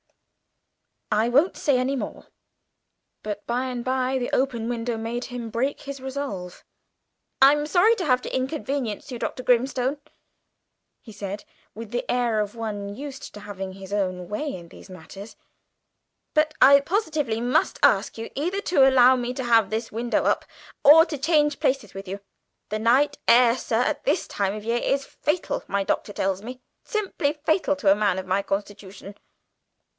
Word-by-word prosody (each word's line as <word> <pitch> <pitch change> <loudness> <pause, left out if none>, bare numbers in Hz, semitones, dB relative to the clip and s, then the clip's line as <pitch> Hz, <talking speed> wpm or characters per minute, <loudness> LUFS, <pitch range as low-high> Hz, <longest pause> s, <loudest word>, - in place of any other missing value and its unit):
I 220 +2 +2
won't 285 +9 +3
say 280 -3 +2
any 255 +2 0
more." 265 - -6 0.9
But 210 -1 -6
by 245 +2 -1
and 250 -2 -4
by, 260 +1 0
the 245 -1 -3
open 245 -4 0
window 235 -1 -2
made 230 +2 -4
him 245 -3 -6
break 260 +5 -1
his 280 -1 -7
resolution. 260 -10 -6 0.8
"I'm 295 +2 +5
sorry 390 +8 +4
to 255 -9 0
inconvenience 265 -3 -3
you, 245 - -5
Dr. 255 - -4
Grimstone," 255 +3 +1 1.0
he 225 - -13
said, 200 0 -6 0.3
with 225 -1 -8
the 245 - -3
air 240 -3 +1
of 210 +1 -2
one 205 -3 -5
used 275 +1 -8
to 210 - -10
having 195 -2 -6
his 195 0 -11
way 205 - -2
in 170 -2 -11
these - - -14
matters, 195 +4 -11 1.0
"but 305 0 +2
I 280 +1 +8
positively 305 - -1
must 250 +6 +1
ask - - +3
you 225 - -6
either 355 +8 -2
to 275 -9 +4
allow 260 0 +6
me 245 0 -3
to 260 - -3
have 230 -4 +4
this 225 +1 -3
window 235 +2 -1
up - - +1 0.4
or 320 +3 +9
to 320 -4 -5
change 295 0 +2
places 270 - 0
with 195 0 -8
you. 195 +2 -6 0.5
The 215 - -2
night 265 +6 +2
air, 235 0 +6
sir, 230 -1 0
at - - -1
this 305 +5 +1
time 200 0 -1
of 215 - -7
the 225 - -5
year 235 +1 +2
is 275 0 0
fatal, 300 +4 -2
my 200 0 0
doctor 205 +1 -2
tells 195 -1 -1
me, 250 +3 -9 0.2
simply 375 -9 -1
fatal 310 0 0
to 210 -8 +3
a - - +6
man 205 -3 +1
of 190 - -4
my 190 +2 +1
constitution." 200 0 -6
245 Hz, 170 wpm, -24 LUFS, 210-280 Hz, 1.0 s, or